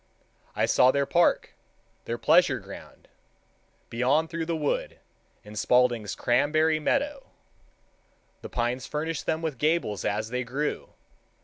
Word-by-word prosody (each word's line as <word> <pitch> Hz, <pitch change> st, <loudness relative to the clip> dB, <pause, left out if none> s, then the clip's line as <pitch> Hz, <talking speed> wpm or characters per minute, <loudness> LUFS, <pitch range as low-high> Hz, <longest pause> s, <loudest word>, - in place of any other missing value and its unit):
I -, -, +2 dB
saw 125 Hz, -, +4 dB
their 140 Hz, +1 st, +2 dB
park, 170 Hz, +4 st, +2 dB, 0.5 s
their 115 Hz, -, -3 dB
pleasure 165 Hz, +7 st, +4 dB
ground, -, -, -12 dB, 0.8 s
beyond 140 Hz, +8 st, +1 dB
through 165 Hz, -1 st, -3 dB
the 170 Hz, -, -1 dB
wood, 150 Hz, -2 st, -2 dB, 0.5 s
in 105 Hz, +1 st, -12 dB
Spaulding's 120 Hz, -2 st, +2 dB
cranberry 155 Hz, +6 st, +2 dB
meadow. 280 Hz, -, -1 dB, 1.1 s
The -, -, -8 dB
pines 120 Hz, +1 st, -2 dB
furnished 155 Hz, 0 st, -4 dB
them 160 Hz, +1 st, -1 dB
with 155 Hz, -6 st, -3 dB
gables 150 Hz, -, 0 dB
as 105 Hz, +1 st, -2 dB
they 125 Hz, 0 st, -1 dB
grew. 135 Hz, +5 st, -4 dB
145 Hz, 125 wpm, -26 LUFS, 120-160 Hz, 1.1 s, saw